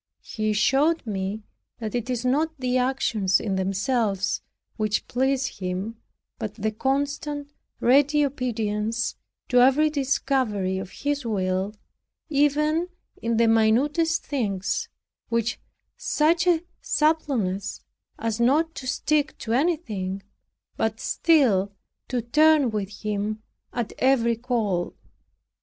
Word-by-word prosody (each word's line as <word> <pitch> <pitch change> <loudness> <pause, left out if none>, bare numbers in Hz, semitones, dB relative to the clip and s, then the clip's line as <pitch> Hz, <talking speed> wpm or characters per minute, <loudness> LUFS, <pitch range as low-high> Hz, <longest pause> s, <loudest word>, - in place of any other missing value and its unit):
He 215 -2 -2
showed 280 +10 +2
me 200 0 -3 0.3
that 220 -3 -5
it 240 0 -2
is 250 -1 -2
not 310 +5 +1
the 255 0 +1
actions 230 -7 +1
in 195 -3 -2
themselves 195 +1 0 0.3
which 215 -2 -1
please 265 0 0
Him, 190 +4 -4 0.4
but 215 -2 -4
the 220 0 -1
constant 285 +4 -2 0.3
ready 290 +4 +4
obedience 230 -4 -1 0.4
to 250 - +5
every 290 +4 +5
discovery 260 -9 0
of 190 - -6
His 290 +5 -2
will, 195 -2 -1 0.5
even 300 +3 +2 0.3
in 230 0 0
the 230 0 +4
minutest 270 +9 +3
things, 235 - -1 0.4
with 230 +1 0 0.4
such 330 +3 +2
a 340 -2 +3 0.2
suppleness, 245 - 0 0.4
as 225 0 -2
not 300 +7 +3
to 260 - -7
stick 300 +3 0
to 225 - -3
anything, 220 - -1 0.5
but 220 0 -1
still 235 - +3 0.4
to 245 -2 -2
turn 300 +1 +4
with 205 -3 -2
Him 215 +1 -2 0.3
at 240 -3 -3
every 240 -3 +3
call. 220 -7 -1
240 Hz, 115 wpm, -25 LUFS, 210-285 Hz, 0.5 s, to